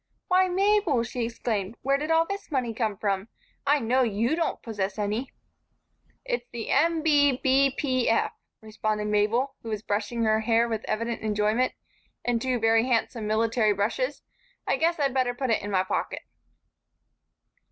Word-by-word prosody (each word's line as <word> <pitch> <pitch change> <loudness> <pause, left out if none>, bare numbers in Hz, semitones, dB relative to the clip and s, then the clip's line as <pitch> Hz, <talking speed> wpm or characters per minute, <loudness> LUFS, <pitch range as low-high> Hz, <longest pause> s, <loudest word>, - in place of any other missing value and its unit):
"Why, 370 0 +4
Mabel!" 385 - +2
she 235 +1 -3
exclaimed. 225 -3 -3
"Where 275 +1 +2
did 305 +2 -3
all 325 0 +4
this 395 +3 -6
money 255 -6 -1
come 215 -3 -1
from? 195 0 -1 0.4
I 290 +1 +4
know 250 +2 +2
you 230 +4 +1
don't 335 -1 -1
possess 200 -4 -3
any." 215 +5 -2 0.9
"It's - - -3
the 230 -2 -5
M. 325 +2 +2
B. 290 -3 +4
B. 270 +1 +2
P. 255 -4 +1
F.," 225 - +2 0.3
responded 215 -1 -2
Mabel, 220 +6 +1
who 230 - -7
was 215 -1 -3
brushing 215 +3 -1
her 220 0 +3
hair 230 +1 +2
with 225 -2 -3
evident 230 +1 -2
enjoyment 215 +3 +1 0.5
and 240 -2 +1
two 255 0 0
very 225 0 +3
handsome 230 -2 0
military 220 0 +2
brushes. 215 - -1 0.4
"I - - +1
guess 335 +1 +1
I'd 275 -3 +1
better 255 -2 +1
put 260 -1 -1
it 220 - +2
in 205 - -5
my 185 -2 +2
pocket." 190 - -3
235 Hz, 165 wpm, -26 LUFS, 215-275 Hz, 0.9 s, Why